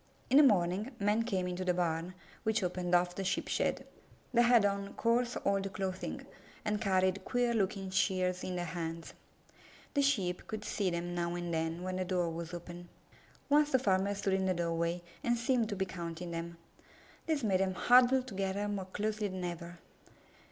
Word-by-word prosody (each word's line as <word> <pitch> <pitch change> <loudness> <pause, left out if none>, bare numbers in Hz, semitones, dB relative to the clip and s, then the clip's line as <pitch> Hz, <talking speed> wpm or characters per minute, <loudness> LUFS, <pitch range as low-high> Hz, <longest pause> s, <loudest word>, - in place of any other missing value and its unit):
In 270 - +7
the - - +10
morning, 200 -2 +3
men 210 +2 +2
came 195 -6 -1
into 180 +1 -3
the 180 -1 +1
barn, 170 0 -1 0.3
which 220 -2 0
opened 180 0 0
off 175 0 +2
the 195 - -4
Sheep 185 - -1
shed. - - 0 0.5
They 240 - +5
had 240 -3 +5
on 200 0 -1
coarse, 240 +1 +1
old 195 0 +1
clothing, 190 -1 -4 0.4
and 210 0 0
carried 190 -1 +2
queer 245 -1 +1
looking 195 -3 -1
shears 185 -1 +1
in 185 - -3
their 175 -1 -2
hands. 165 0 -5 0.8
The 285 - +3
Sheep 200 -11 0
could 215 -1 -5
see 200 -3 0
them 175 0 -3
now 170 0 -1
and 175 -1 -3
then 165 +2 -1
when 185 0 -3
the 185 - 0
door 175 -2 0
was 165 0 -5
open. 175 0 -8 0.6
Once 295 +1 +4
the 260 - +5
farmer 200 -4 +1
stood 195 -1 -1
in 190 0 +1
the 185 - +1
doorway 170 0 -1 0.2
and 240 0 +2
seemed 235 -1 +1
to 205 - -2
be 190 0 0
counting 170 -2 -6
them. 170 0 -5 0.7
This 310 -5 0
made 195 -4 +2
them 190 -1 0
huddle 250 +4 +5
together 195 -3 -2
more 200 -2 -3
closely 210 +2 -2
than 185 -1 -5
ever. 175 0 -5
190 Hz, 185 wpm, -33 LUFS, 175-210 Hz, 0.8 s, the